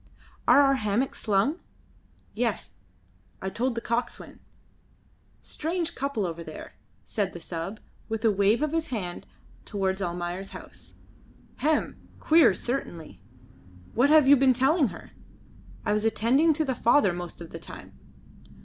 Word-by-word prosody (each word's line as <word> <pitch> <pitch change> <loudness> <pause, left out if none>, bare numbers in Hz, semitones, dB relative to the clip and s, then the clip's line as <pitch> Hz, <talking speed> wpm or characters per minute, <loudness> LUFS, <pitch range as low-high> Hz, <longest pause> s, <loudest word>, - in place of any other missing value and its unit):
Are 285 - +7
our 275 -1 +4
hammocks 215 +4 -1
slung?" 220 - +1 0.7
"Yes, - - -3 0.6
I 190 - -4
told 245 +3 -1
the 230 - -3
coxswain. 235 +2 -3 1.0
Strange 340 +2 -3
couple 275 - -2
over 170 -1 -5
there," - - -10 0.3
said 200 -4 -2
the 175 - -7
sub, 170 +5 -6 0.3
with 225 +1 -2
a 220 - +5
wave 205 +6 +2
of 305 - 0
his 325 0 -1
hand 185 -8 -5 0.4
towards 195 -2 -2
Almayer's 175 +1 -4
house. - - -15 0.6
"Hem! 305 +1 0 0.2
Queer, 325 0 +5
certainly. 165 - -5 0.7
What 255 +5 +3
have 305 -3 +6
you 285 - +9
been 265 -1 +4
telling 270 +4 +3
her? - - -10 0.7
I 210 - +1
was 210 0 0
attending 235 +8 +3
to 310 +1 0
the 265 - 0
father 235 -4 +3
most 175 0 -7
of 170 -1 -10
the - - -7
time." - - -11
230 Hz, 140 wpm, -27 LUFS, 190-280 Hz, 1.0 s, you